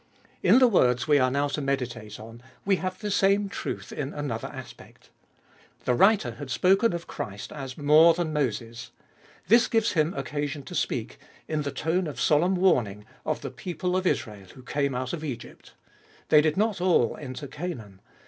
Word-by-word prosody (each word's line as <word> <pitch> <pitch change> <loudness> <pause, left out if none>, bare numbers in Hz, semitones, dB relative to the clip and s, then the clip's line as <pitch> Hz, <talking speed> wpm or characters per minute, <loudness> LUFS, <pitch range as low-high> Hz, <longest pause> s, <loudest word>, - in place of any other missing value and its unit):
In - - +6
the 255 -1 +7
words 125 - +2
we 145 -1 +5
are 130 -1 +3
now 140 +2 0
to 145 - -3
meditate 125 -6 -3
on 115 +2 -11 0.2
we 195 -1 +3
have 185 0 -4
the 210 -1 -4
same 200 +1 +3
truth - - -5
in 145 0 -5
another 140 -7 -3
aspect. 125 -4 -12 0.7
The 125 - +2
writer 195 - +4
had 130 +4 -9
spoken 195 - +3
of 170 0 -4
Christ 100 -1 -7
as 135 -3 -7
more 155 +3 +6
than 165 -3 -2
Moses. 120 -4 -3 0.6
This 235 +5 +5
gives 225 -2 +1
him 160 0 +1
occasion 145 +1 -3
to - - -10
speak, - - -2 0.3
in 155 -1 -1
the 145 - -3
tone 165 +6 -1
of 140 -5 -7
solemn 165 +8 +3
warning, 120 - +1 0.2
of - - -1
the - - -6
people 180 +1 -3
of 185 0 +1
Israel 105 - -2
who 130 - -13
came 140 0 -1
out 130 0 -3
of 160 -2 -4
Egypt. 135 -7 -8 0.5
They 150 - +7
did 155 +1 0
not 210 -3 +1
all 175 -11 +3
enter 130 -1 -7
Canaan. 135 - -7
145 Hz, 180 wpm, -26 LUFS, 125-180 Hz, 0.7 s, the